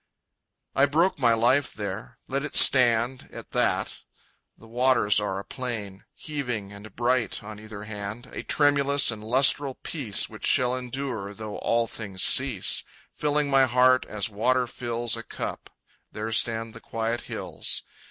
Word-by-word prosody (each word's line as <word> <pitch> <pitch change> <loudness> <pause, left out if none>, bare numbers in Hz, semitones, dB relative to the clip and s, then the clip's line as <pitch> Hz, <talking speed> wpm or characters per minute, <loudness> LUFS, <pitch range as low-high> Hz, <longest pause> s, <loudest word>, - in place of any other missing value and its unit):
I 140 - +4
broke 165 +4 +1
my 120 -3 +4
life 125 +4 +1
there. 100 -2 -6
Let 135 +1 -2
it 150 - -5
stand 125 0 +5
At - - -11
that. - - -1 0.6
The 115 - -16
waters 120 -4 +2
are 100 -2 -3
a 100 - -6
plain, 110 -7 -6
Heaving 125 -10 -5
and 100 +2 -12
bright 120 -2 0
on 105 0 -9
either 105 -1 -9
hand, 105 +2 -7
A - - -5
tremulous 140 -2 +3
and 105 -1 -8
lustral 130 +3 +3
peace 120 -11 -1
Which 110 - -5
shall 125 -2 +3
endure 125 -5 -5
though 110 -1 -7
all 115 0 +1
things 100 -5 -4
cease, 130 -8 +3 0.3
Filling 150 0 0
my 135 -1 +5
heart 125 +1 +3
as 105 -2 -2
water 125 +4 +1
fills 120 -1 -2
A - - -5
cup. - - -6 0.4
There 110 +1 -5
stand 115 0 0
the 115 - -12
quiet 115 +1 -3
hills. - - -3
120 Hz, 150 wpm, -25 LUFS, 105-130 Hz, 0.6 s, stand